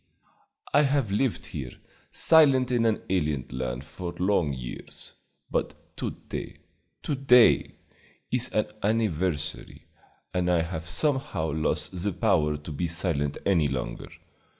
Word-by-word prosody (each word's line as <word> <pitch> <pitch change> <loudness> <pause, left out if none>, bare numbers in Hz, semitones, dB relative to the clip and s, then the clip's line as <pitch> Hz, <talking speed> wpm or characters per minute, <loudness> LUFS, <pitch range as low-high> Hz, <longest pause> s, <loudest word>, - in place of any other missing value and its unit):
I 145 - +6
have 140 -6 +1
lived 115 +4 0
here - - -6 0.4
silent 135 -6 +5
in 120 -2 +3
an 110 - 0
alien 75 -7 0
land 65 +1 -4
for 90 +2 -6
long 90 -5 +1
years; 65 -3 -8 0.4
but - - -4
to - - -2 0.2
day - - -6 0.5
to - - -1
day 125 -3 +5 0.6
is - - +1
an - - +1 0.2
anniversary, 90 -8 -1 0.5
and 90 -1 0
I 85 -2 +3
have 85 0 -5
somehow 130 - -1
lost 80 +3 -1
the 100 -2 +1
power 80 -8 +2
to 75 +2 -9
be 85 +4 -2
silent 80 -4 0
any 85 -7 +3
longer. 65 -3 -4
90 Hz, 130 wpm, -27 LUFS, 75-115 Hz, 0.6 s, I